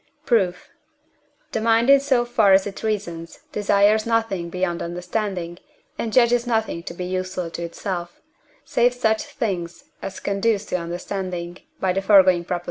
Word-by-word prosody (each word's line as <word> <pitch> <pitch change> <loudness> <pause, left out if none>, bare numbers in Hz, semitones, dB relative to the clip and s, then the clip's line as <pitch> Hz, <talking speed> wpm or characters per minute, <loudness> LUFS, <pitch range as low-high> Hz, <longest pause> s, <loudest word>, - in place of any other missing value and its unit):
Proof. 190 -7 +1 0.8
The 220 - -2
mind, 230 +3 +4
in 280 - +8
so 265 -3 +1
far 225 -5 +4
as 190 0 +5
it 200 -2 -6
reasons, 170 -6 -3
desires 205 +1 +3
nothing 225 -7 0
beyond 180 -1 -2
understanding, 180 0 -3 0.4
and 225 - -3
judges 240 0 +3
nothing 220 -7 0
to 170 - -8
be 180 - -4
useful 185 -1 -3
to 170 - -6
itself, 175 0 -5 0.5
save 245 +1 +2
such 220 -3 +1
things 175 -6 -4 0.2
as 190 - -6
conduce 200 +1 0
to - - -1
understanding 175 0 -5 0.2
(by 185 -1 +1
the 195 - 0
foregoing 190 -3 +5
Prop.). 180 0 -2
195 Hz, 150 wpm, -22 LUFS, 175-225 Hz, 0.8 s, in